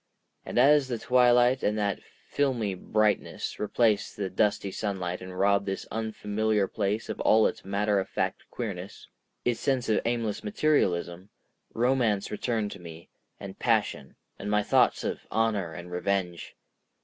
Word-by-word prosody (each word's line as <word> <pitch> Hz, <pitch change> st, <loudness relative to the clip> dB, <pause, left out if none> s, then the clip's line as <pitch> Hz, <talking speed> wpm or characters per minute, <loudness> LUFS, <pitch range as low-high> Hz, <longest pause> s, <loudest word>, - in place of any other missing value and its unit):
And -, -, -4 dB
as 140 Hz, +2 st, +5 dB
the 120 Hz, -2 st, -2 dB
twilight 125 Hz, +1 st, +4 dB
and 105 Hz, +1 st, 0 dB
that 100 Hz, -2 st, 0 dB, 0.3 s
filmy 125 Hz, -8 st, 0 dB
brightness 105 Hz, +3 st, -1 dB
replaced 105 Hz, 0 st, +1 dB
the 100 Hz, -2 st, -3 dB
dusty 100 Hz, 0 st, +1 dB
sunlight 95 Hz, -4 st, -3 dB
and 90 Hz, 0 st, -8 dB
robbed 100 Hz, +1 st, +2 dB
this 95 Hz, -, -3 dB
unfamiliar 110 Hz, -1 st, -1 dB
place 105 Hz, +2 st, -2 dB
of -, -, -5 dB
all 110 Hz, 0 st, +4 dB
its -, -, -1 dB
matter 100 Hz, +1 st, +1 dB
of 95 Hz, -, -4 dB
fact -, -, -3 dB
queerness, -, -, -6 dB, 0.4 s
its 120 Hz, -2 st, +1 dB
sense 130 Hz, -4 st, 0 dB
of 110 Hz, -, +2 dB
aimless 115 Hz, -3 st, -1 dB
materialism, 95 Hz, -, 0 dB, 0.5 s
romance 115 Hz, -4 st, +1 dB
returned 110 Hz, -1 st, -1 dB
to 100 Hz, -, -9 dB
me, 85 Hz, -1 st, -11 dB, 0.3 s
and -, -, -9 dB
passion, 65 Hz, -, 0 dB, 0.2 s
and -, -, -5 dB
my 105 Hz, 0 st, +2 dB
thoughts -, -, +3 dB
of -, -, -4 dB
honor 105 Hz, -6 st, 0 dB
and 85 Hz, +2 st, -9 dB
revenge. 90 Hz, -3 st, -2 dB
105 Hz, 150 wpm, -28 LUFS, 95-115 Hz, 0.5 s, as